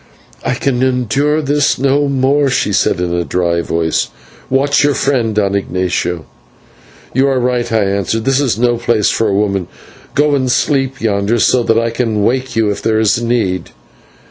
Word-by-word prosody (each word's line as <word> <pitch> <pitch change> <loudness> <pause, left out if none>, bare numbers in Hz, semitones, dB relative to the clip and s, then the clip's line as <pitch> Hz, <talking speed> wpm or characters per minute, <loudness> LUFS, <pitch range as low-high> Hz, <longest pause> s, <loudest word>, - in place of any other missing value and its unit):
"I - - -1
can 130 -3 -1
endure 130 +4 +1
this 145 +1 +1
no 140 +2 +1
more," 140 +1 +1
she 105 -5 0
said, 95 - +1
in 90 -1 -2
a 85 0 0
dry 85 -1 0
voice; 80 -1 -1 0.4
"watch 140 +2 +2
your 145 -1 +2
friend, 120 -6 0
Don 100 -2 +1
Ignatio." 90 -3 -2 0.9
"You 135 +2 +2
are 135 -2 +1
right," 125 -1 -1
I 110 -2 +2
answered, 100 +3 -1
"this 135 0 +2
is 135 -6 0
no 120 0 +1
place 115 -3 +1
for 115 - 0
a 100 - 0
woman. 100 -3 0 0.5
Go 145 +1 +2
and 130 -3 +1
sleep 135 0 0
yonder, 105 +1 0
so 125 +2 +3
that 115 -1 +1
I 115 0 0
can 115 -3 -1
wake 125 +2 -1
you 110 -2 +2
if 100 - -5
there 110 -1 +1
is 110 +1 +2
need." 110 -7 -1
115 Hz, 180 wpm, -15 LUFS, 100-135 Hz, 0.9 s, so